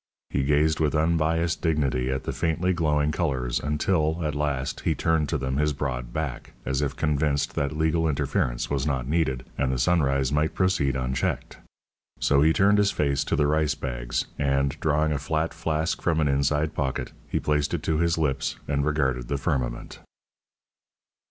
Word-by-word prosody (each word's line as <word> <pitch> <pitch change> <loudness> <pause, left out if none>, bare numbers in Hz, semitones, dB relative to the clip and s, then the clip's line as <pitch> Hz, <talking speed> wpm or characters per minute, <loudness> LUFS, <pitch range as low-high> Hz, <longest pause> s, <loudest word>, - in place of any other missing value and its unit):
He - - +1
gazed 75 +3 +2
with 80 -1 +1
unbiased 80 +1 +1
dignity 70 -6 0
at 65 0 -2
the - - -3
faintly 85 +3 0
glowing 75 -3 +1
colours 65 -7 -1
until, 80 +2 0
at 75 - -1
last, 75 -2 -2
he - - 0
turned 80 -3 +1
to 80 - 0
them 65 -1 -2
his 75 0 +1
broad 60 -4 -3
back, 75 -3 -4
as 65 +1 0
if 70 -2 -1
convinced 75 -2 0
that 70 +2 -2
legal 80 +1 +2
interference 70 -4 -1
was 70 0 -1
not 65 -4 -1
needed, 65 -5 0
and 65 - +1
the 65 - -1
sunrise 70 -3 +2
might 75 +2 +1
proceed 95 -8 +1
unchecked. 65 0 -2 0.6
So 70 0 +3
he 80 +2 +5
turned 100 +3 +4
his 100 -1 +4
face 70 -5 0
to - - 0
the 75 - +2
rice 75 -1 +1
bags, - - -3
and, 70 0 +1
drawing 75 0 +1
a 75 - 0
flat 80 +3 -1
flask 80 +1 -1
from 80 -2 +1
an 75 - +2
inside 75 +3 +1
pocket, 65 -4 -2 0.2
he - - -1
placed 75 -1 0
it - - -5
to 80 -1 0
his 85 0 +2
lips 70 -4 -1
and 70 -1 0
regarded 65 -5 0
the 70 - -1
firmament. 65 -5 -3
75 Hz, 175 wpm, -26 LUFS, 70-80 Hz, 0.6 s, he